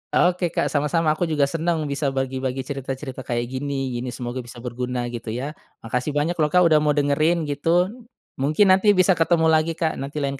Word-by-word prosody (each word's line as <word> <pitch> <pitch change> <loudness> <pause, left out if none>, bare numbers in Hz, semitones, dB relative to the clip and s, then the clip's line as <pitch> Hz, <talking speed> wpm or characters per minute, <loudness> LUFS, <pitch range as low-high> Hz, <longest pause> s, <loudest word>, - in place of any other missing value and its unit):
Oke, 180 0 +3
Kak, - - 0
sama-sama. 155 +2 +1
Aku 165 +2 -1
juga 150 -3 +1
seneng 160 +2 0
bisa 140 0 -2
bagi-bagi 130 0 -2
cerita-cerita 135 0 -6
kayak 120 -1 -1
gini, 135 -1 -3
gini 125 - -5
semoga 125 +1 -5
bisa 120 -1 -9
berguna, 125 0 -3
gitu, 115 -1 -7
ya. 140 +4 -3 0.3
Makasih 125 +6 -2
banyak 150 +4 +1
loh, 150 - +4
Kak, 180 +4 +4
udah 155 -2 +5
mau 150 -1 +1
dengerin 155 +4 +2
gitu, 165 +6 +1 0.5
mungkin 155 +8 +3
nanti 200 +2 +5
bisa 185 +1 +4
ketemu 165 -1 +3
lagi, 160 +1 +2
Kak, 165 -1 -1
nanti 140 +2 -4
lain 140 0 -2
145 Hz, 190 wpm, -23 LUFS, 130-165 Hz, 0.5 s, udah